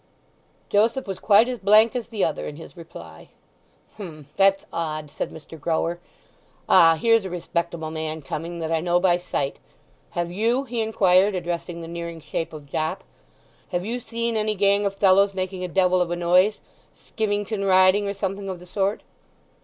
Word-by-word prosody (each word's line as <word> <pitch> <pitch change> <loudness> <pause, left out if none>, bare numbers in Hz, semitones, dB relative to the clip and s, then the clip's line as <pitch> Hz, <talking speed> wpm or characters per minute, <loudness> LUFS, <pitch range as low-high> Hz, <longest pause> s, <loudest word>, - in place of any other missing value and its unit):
Joseph 225 +6 +2
was 195 -2 -5
quite 215 +2 +5
as 250 -2 -4
blank 215 +4 +5
as 240 -2 -4
the 215 -4 0
other 155 - -3
in 150 - -7
his 165 - -12
reply. 85 - -12 0.7
"H'm—that's 195 +3 0
odd," 155 -3 -4
said - - -4
Mr. 160 0 -12
Grower. 165 +2 -1 0.7
"Ah—here's 170 +8 +5
a 190 - -5
respectable 170 -2 -3
man 160 -1 -4
coming 165 +4 -5
that 160 0 -3
I 165 - +2
know 175 +1 +1
by 175 -1 +3
sight. 140 -5 -3 0.6
Have 175 0 -1
you," 230 +8 +1
he 240 -3 -3
inquired, 195 -2 +3
addressing 175 -1 -4
the 165 - -7
nearing 170 0 -6
shape 165 +1 -4
of 150 -2 -10
Jopp, 155 +3 -3 0.7
"have 180 +1 -2
you 240 +3 -3
seen 230 0 -3
any 215 0 0
gang 200 +1 +2
of 195 - -4
fellows 195 0 +4
making 185 0 -3
a - - -2
devil 185 0 +2
of 175 - 0
a 175 - -1
noise—skimmington 205 +3 -1
riding, 190 +2 +4
or 200 - -4
something 195 0 -4
of 185 - -4
the 180 - -14
sort?" 195 +3 -1
185 Hz, 170 wpm, -23 LUFS, 170-205 Hz, 0.7 s, quite